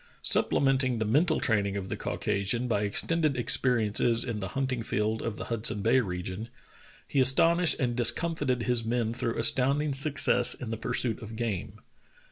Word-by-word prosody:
Supplement 135 -1 +3
ing 130 -2 -1
the 110 - -2
mental 155 +9 +1
training 100 -3 0
of 95 -1 -6
the - - -3
Caucasian 105 +4 -2
by 105 -4 -1
extended 155 +7 +1
experiences 115 -2 +1
in 115 -4 -5
the 95 - -5
hunting 130 -3 -2
field 110 0 -2
of 115 -2 -4
the - - -7
Hudson 110 -3 -2
Bay 120 +4 +3
region, 95 +1 -5 0.6
he 140 - -1
astonished 165 +7 +3
and 120 -3 -1
discomfited 130 0 0
his 120 -1 +1
men 115 0 -2
through 115 -1 -4
astounding 140 +5 +2
success 135 -3 +4
in 115 -3 -8
the - - -2
pursuit 115 +1 -3
of 110 0 -9
game. 110 -5 -5
120 Hz, 165 wpm, -27 LUFS, 110-130 Hz, 0.6 s, success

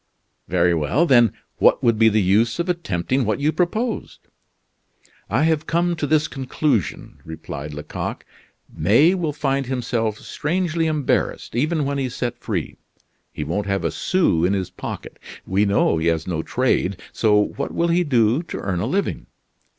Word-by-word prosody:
"Very 90 - +2
well. 85 - +1
Then, 120 -7 +5 0.3
what - - +4
would 115 -2 +3
be 110 0 +6
the 110 -1 +2
use 110 +5 +2
of 170 +1 -2
attempting 130 - -1
what 110 +2 -1
you 150 +2 +2
propose?" 215 +8 -2 1.1
"I 120 +8 +2
have 160 -1 +1
come 170 +1 +1
to 150 - -2
this 155 0 +2
conclusion," 130 - -2
replied 75 -2 -7
Lecoq, 75 - -5 0.5
"May 115 - +4
will 170 -5 -1
find 140 -2 -1
himself 120 -4 -1
strangely 165 +3 -1
embarrassed, 150 -6 -1
even 150 +4 +1
when 140 0 -1
he's 130 -2 -3
set 120 -1 -3
free. 90 -9 -4 0.5
He 75 - -5
won't 100 +7 -2
have 100 -1 -1
a - - +1
sou 175 - +1
in 95 +3 +2
his 95 -2 -2
pocket; - - -7 0.3
we 100 +3 +1
know 100 -4 +2
he 80 - 0
has 80 -1 +1
no 85 -4 -2
trade, 110 -4 0
so 105 -2 +3
what 105 - -2
will 170 0 0
he 175 +1 +3
do 120 -2 +2
to 170 - -7
earn 95 -3 -2
a - - -1
living? 200 +1 -2
125 Hz, 165 wpm, -22 LUFS, 100-155 Hz, 1.1 s, be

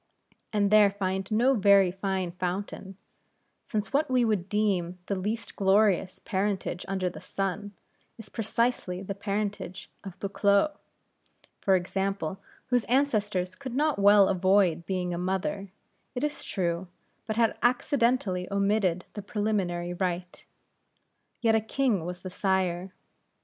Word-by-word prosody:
and 205 -2 +1
there 210 -1 +7
find 190 -1 -2
no 240 +5 +4
very 200 -4 +5
fine 190 -1 -2
fountain; 190 +1 -4 0.7
since 210 -3 -3
what 290 +1 +2
we 250 -2 +3
would 200 -4 0
deem 190 -4 0
the 200 - -2
least 210 +4 -3
glorious 195 -1 +3
parentage 190 -2 -2
under 190 -2 -1
the 180 - -6
sun, 195 +1 -3 0.5
is 225 -2 -10
precisely 220 -4 -1
the 200 - -4
parentage 200 -2 -4
of 190 -3 -8
a - - -37
Buccleugh, 200 +7 +2 0.8
for 195 - +3
example; 190 0 -2 0.3
whose 245 -2 +2
ancestress 210 -9 +1
could 255 +5 -7
not 300 -3 +1
well 200 0 +7
avoid 185 -3 +2
being 180 -2 -1
a 170 - -3
mother, 190 +2 -2 0.5
it 250 - -2
is 295 0 -2
true, 175 -1 -2 0.4
but 220 - -2
had 230 0 +2
accidentally 240 -7 +1
omitted 200 -3 +1
the 210 - -5
preliminary 190 -4 -1
rite. 180 0 -3 1.0
Yet 225 -2 +3
a 220 - +3
king 220 -5 0
was 180 0 -6
the 185 - -7
sire. 190 -1 0
195 Hz, 135 wpm, -28 LUFS, 185-215 Hz, 1.0 s, there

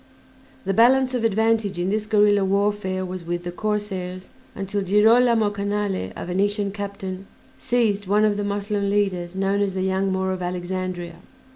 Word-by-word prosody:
The 195 - 0
balance 255 +4 +4
of 245 -2 -1
advantage 220 -2 +1
in 180 +2 -1
this 215 0 -1
guerilla 205 -2 +4
warfare 195 -1 0
was 185 -1 -6
with 175 +1 -3
the 175 - -4
corsairs 190 -2 -4 0.2
until 195 +1 -3
Girolame 220 +3 +4
Canale, 200 - -2
a - - -6
Venetian 200 +3 0
captain, 195 -1 -6 0.3
seized 225 -6 0
one 210 +2 +3
of 210 -1 +2
the 205 - -2
Moslem 200 0 -1
leaders 190 -3 -1
known 195 +1 0
as 195 -2 -1
"The 185 - -1
Young 190 +1 0
Moor 190 0 0
of 185 -1 -4
Alexandria." 180 -1 -4
200 Hz, 160 wpm, -23 LUFS, 185-210 Hz, 0.3 s, balance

